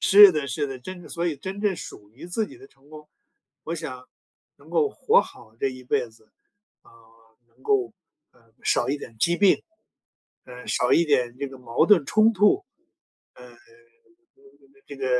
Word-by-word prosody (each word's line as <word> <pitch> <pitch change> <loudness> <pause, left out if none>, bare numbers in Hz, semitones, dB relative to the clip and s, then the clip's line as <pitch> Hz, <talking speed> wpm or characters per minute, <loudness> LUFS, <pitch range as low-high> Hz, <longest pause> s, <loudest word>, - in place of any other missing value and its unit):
是 200 -1 +8
的， 150 -2 -2
是 145 +1 -2
的， 135 -1 -7
真 185 +8 -9
的， - - -13
所 170 +1 -3
以 155 - -2
真 190 +8 -7
正 205 -3 +1
属 105 -9 -11
于 130 +9 -12
自 210 +4 -2
己 - - -14
的 400 +2 -15
成 140 - -27
功， 150 -1 -13 0.6
我 165 - -3
想 130 -6 -8 0.5
能 - - -20
够 445 -2 +2
活 455 +3 +3
好 110 0 -12
这 135 - +1
一 130 -1 -10
辈 120 - -1
子， 110 -1 -24 0.5
啊， - - -22 0.6
能 120 +3 -29
够， 125 -5 +1 0.4
呃， 115 -2 -28
少 - - +1
一 145 - 0
点 115 - -11
疾 170 +7 +2
病， 200 0 +3 0.8
呃， 125 0 -12
少 125 - +1
一 170 - +5
点 125 -5 +1
这 140 - -3
个 135 - -12
矛 120 -2 0
盾 185 -9 +5
冲 215 +7 +3
突， 210 - +3 0.7
呃， 125 -1 -15 1.3
这 140 - -10
个 135 -1 -4
140 Hz, 195 characters per minute, -24 LUFS, 125-185 Hz, 1.3 s, 是